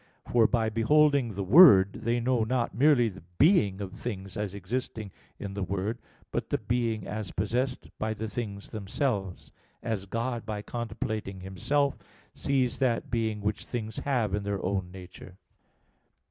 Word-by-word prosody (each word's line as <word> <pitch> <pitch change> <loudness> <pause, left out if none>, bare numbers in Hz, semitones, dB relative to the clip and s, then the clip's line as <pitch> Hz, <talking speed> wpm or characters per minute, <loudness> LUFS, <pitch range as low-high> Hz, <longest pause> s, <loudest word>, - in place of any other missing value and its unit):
For 115 -2 +5
by 115 -3 +1
beholding 135 +1 +3
the 100 - -2
Word, 100 - +8
they 120 +1 -1
know 120 -1 +1
not 120 +1 -1
merely 130 -1 +4
the 95 -3 -7 0.2
being 125 - +4
of 95 -2 -5
things 100 -5 -6
as 105 -2 -3
existing 110 +1 -4 0.3
in 100 -1 -6
the 100 - -4
Word, 100 +5 -2 0.3
but - - -3
the - - +1
being 115 -3 -1
as 105 -2 -4
possessed 125 +6 -1
by 110 0 -1
the 110 +1 -4
things 105 -3 -5
themselves; 100 -2 -3 0.3
as 105 -4 -3
God 115 +3 -2
by 105 -1 -5
contemplating 110 -4 -4
Himself 120 +10 0 0.3
sees 130 -3 0
that 125 -4 0
being 110 -3 -1
which 105 0 -2
things 110 -3 -5
have 120 -8 0
in 105 - 0
their 100 -2 -3
own 95 -1 -1
nature. 90 0 -11
110 Hz, 155 wpm, -28 LUFS, 100-120 Hz, 0.3 s, Word